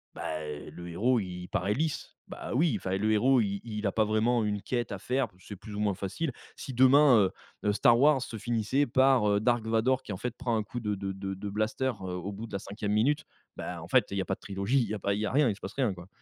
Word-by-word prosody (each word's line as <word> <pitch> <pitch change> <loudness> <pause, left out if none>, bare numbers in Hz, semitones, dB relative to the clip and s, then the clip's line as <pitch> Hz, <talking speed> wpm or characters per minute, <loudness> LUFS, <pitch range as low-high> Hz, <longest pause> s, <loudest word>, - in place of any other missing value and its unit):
bah, 80 -1 -4
le 75 +3 -8
héros 120 +8 +2
il 90 -2 -6
paraît 95 +3 0
lisse, 155 +3 -3
bah, - - -7
oui, 155 -3 +3
enfin, 95 +1 -2
le 110 +2 +1
héros, 125 +4 +4
i 100 -1 -1
il 105 -1 -4
a 100 - +2
pas 110 +1 +2
vraiment 110 +2 +2
une 105 -1 -1
quête 120 -3 -2
à - - -4
faire, 130 +2 0
c'est 100 +1 -10
plus 105 +1 -9
ou 105 - -4
moins 100 -2 +2
facile. 100 - -3 0.2
Si 135 - -7
demain, 130 +1 +6
heu, 95 -2 +3 0.4
heu, 105 - +3
Star 120 +3 +5
Wars 145 -2 +5
se 115 - -5
finissait 120 +5 0
par, 130 -3 +4
heu, 100 - +3
Dark 120 -1 +1
Vador 120 +4 +2
qui, 105 - -5
en - - -5
fait, 125 +3 -3
prend 120 -3 -1
un 110 - 0
coup 120 +3 -6
de 105 -2 -2
de 95 0 -4
de 95 0 -5
de 100 +2 -5
blaster, 110 +6 0
heu, 90 -1 -4
au 90 +3 -4
bout 110 +3 -7
de - - -15
la 100 - -1
5e 105 +1 -4
minute, 145 +8 +2 0.3
bah, - - -5
en - - -11
fait, - - +4
il 100 - -2
y - - +1
a - - -3
pas 95 - -1
de - - -31
trilogie, 100 +7 0
il - - -1
y - - -2
a 105 - -3
pas 100 +1 0
il 105 - -2
y 110 - 0
a - - -2
rien, 145 -4 +4
il 100 - -1
se - - -18
passe 95 - -7
rien, 125 -8 0
quoi. 90 0 -11
110 Hz, 285 wpm, -29 LUFS, 100-125 Hz, 0.4 s, demain